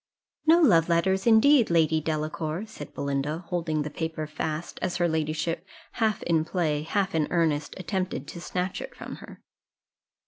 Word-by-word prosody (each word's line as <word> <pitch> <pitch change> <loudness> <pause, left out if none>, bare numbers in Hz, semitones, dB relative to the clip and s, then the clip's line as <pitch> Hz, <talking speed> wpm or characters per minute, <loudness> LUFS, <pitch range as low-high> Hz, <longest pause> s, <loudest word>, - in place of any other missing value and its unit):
"No 330 +2 +7
love 175 - +5
letters, 190 +4 +2
indeed, 235 +3 +6
Lady 160 -2 +3
Delacour," 155 +3 -2
said 150 -9 -10
Belinda, 140 +4 -2
holding 160 -4 -1
the 150 - -5
paper 160 0 -3
fast, 155 +1 -4
as 185 - -1
her 175 -1 +2
ladyship, 160 +1 -1 0.3
half 220 -3 0
in 165 -2 +2
play, 160 -3 0
half 195 +4 -1
in 155 -2 +1
earnest, 155 -4 0
attempted 185 0 -3
to 175 - -8
snatch 180 +1 -3
it - - -8
from - - -8
her. - - -13
165 Hz, 160 wpm, -27 LUFS, 155-185 Hz, 0.3 s, No